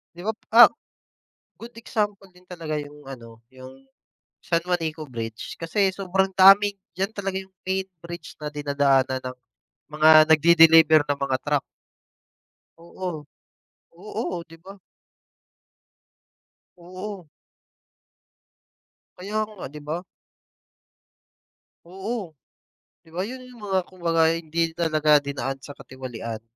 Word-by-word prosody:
'Di 175 - -10
ba, - - +2 0.2
ah 240 - +11 0.9
good 235 +1 -11
example 205 -4 -3
din 180 0 -21
talaga 165 -4 -6
yung 145 -1 -10
ano 115 -4 -11
yung 130 +1 -14 0.5
San 170 -1 -1
Juanico 165 -3 -2
Bridge. 115 -2 -6
Kasi 190 +4 +1
sobrang 190 0 -1
daming, 195 +2 +6 0.2
diyan 195 +3 -2
talaga 200 -3 -4
yung 190 - -19 0.2
main 190 0 -1
bridge 170 +1 -10
na 150 - -7
dinadaanan 140 -3 +1
ng 130 0 -7 0.6
mga 155 +1 +4 0.2
nagde-deliver 160 -1 +6
ng 145 -1 -2
mga 130 -1 0
truck. 145 -1 +1 1.2
Oo, 170 -2 -6 0.7
oo 185 -2 -5
'di 165 0 -15
ba? 195 +1 -11 2.0
Oo. 185 0 -9 1.9
Kaya 205 +4 -3
nga, 210 -4 -9
'di 150 +2 -9
ba? 150 +3 -4 1.9
Oo. 190 0 -6 0.7
'Di 160 - -21
ba 180 - -2
yun 255 +1 -9
yung 245 -3 -15
mga 190 -2 +1
kumbaga 165 -3 +1
hindi 165 0 -2
talaga 155 -3 +3
dinaan 135 -1 -4
sa 145 0 -10
katiwalian. 115 -4 -7
165 Hz, 115 wpm, -24 LUFS, 145-190 Hz, 2.0 s, ah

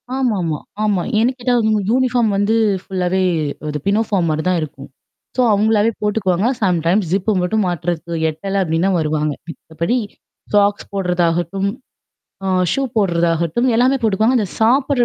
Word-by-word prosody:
ஆமாமா. 195 - 0 0.3
ஆமா. 205 -4 +1 0.2
ஏன்னுக் 245 +4 +1
கேட்டா 245 0 0
அவுங்க 215 -2 +2
யூனிஃபார்ம் 245 -3 +2
வந்து 205 +3 +2 0.3
ஃபுல்லாவே 185 0 -1 0.5
அ - - -2 0.2
பினோஃபார்ம் 200 -4 +1
மாரி 155 0 -1
தான் 180 -2 +2
இருக்கும். 140 -3 -8 0.5
சோ - - +3
அவுங்களாவே 215 +1 +3
போட்டுக்குவாங்க. 205 -1 +1
சம் 180 -4 +2
டைம்ஸ் 185 +2 +2
ஜிப்பு 195 +3 +1
மட்டும் 205 +4 0
மாட்டுறது 175 -1 -3
எட்டல 195 +6 -3
அப்பிடின்னா 165 +2 0
வருவாங்க. 150 -1 -1
மித்தபடி 165 +6 -3 0.6
சாக்ஸ் 205 0 +2
போடுறதாகட்டும். 180 0 0 0.8
ஆ - - -1 0.2
ஷூ 275 - 0
போடுறதாகட்டும் 170 +2 +1
எல்லாமே 255 +3 +3
போட்டுக்குவாங்க. 220 +3 +2
அந்த 210 - 0
சாப்புட்ற 255 +3 +3
195 Hz, 135 wpm, -18 LUFS, 170-220 Hz, 0.8 s, சோ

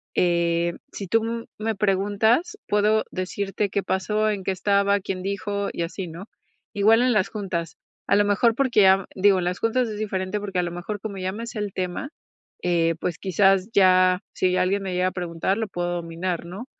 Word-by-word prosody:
eh, 170 -1 +2 0.2
si 200 - -6
tú 225 +3 0
me 220 +1 -2
preguntas, 205 - +1
puedo 210 +1 +2
decirte 195 +2 -2
qué 200 0 -1
pasó, 210 +3 0
en 200 -3 -2
qué 195 - 0
estaba, 200 +1 +2
quién 185 -1 -4
dijo 200 +1 -2
y 170 - -3
así, 180 +2 -5
¿no? 170 +4 -9 0.5
Igual 220 +3 +4
en 250 0 +3
las 210 -4 +2
juntas. 185 -6 -4 0.3
A - - +4
lo 205 0 +4
mejor 220 +3 +3
porque 240 -8 +4
a 190 0 +4
digo, 195 0 +4
en 175 - -2
las 180 0 -2
juntas 235 +2 +1
es 210 -1 -5
diferente, 195 -1 -2
porque 195 -3 -3
a - - +2
lo 175 - -3
mejor 185 +4 -5
como 200 -1 -6
ya 185 0 -2
me 225 +4 -6
sé 225 - -6
el 205 -2 -3
tema, 185 +8 -3 0.5
eh, 165 -2 +2
pues, 175 -2 -2
quizás 195 +1 +2
ya, 185 -1 +5
si 185 0 +1
alguien 195 +2 +1
me 190 -2 -3
llega 180 +1 +1
a 185 - -1
preguntar, 175 +2 -2
lo 225 -2 -2
puedo 175 -1 -3
dominar, 170 +1 -3
¿no? 190 +8 -7
195 Hz, 200 wpm, -24 LUFS, 180-210 Hz, 0.5 s, ya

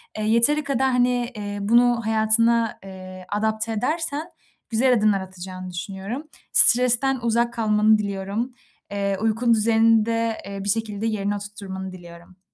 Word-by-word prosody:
E, 215 - -3
yeteri 235 +8 +3
kadar, 265 -2 0
hani, 245 -1 +1
eee, 205 -1 -5
bunu 235 +3 +3
hayatına, 225 +1 +2
eee, 185 -1 -10
adapte 220 +2 -1
edersen 310 +7 -2 0.4
güzel 250 +3 +3
adımlar 210 -4 +2
atacağını 185 0 -8
düşünüyorum. 195 - -6 0.3
Stresten 250 +2 +4
uzak 235 +1 +1
kalmanı 215 -1 +3
diliyorum. 200 +4 -3 0.4
Eee, 200 -1 -1
uyku 225 +2 +2
düzenini 225 0 +3
de, 230 -1 -1
eee, 200 0 -6
bir 200 - -3
şekilde 215 0 -2
yerine 205 -2 -1
oturtturmanı 200 -2 -7
diliyorum. 175 0 -14
220 Hz, 135 wpm, -23 LUFS, 200-235 Hz, 0.4 s, Stresten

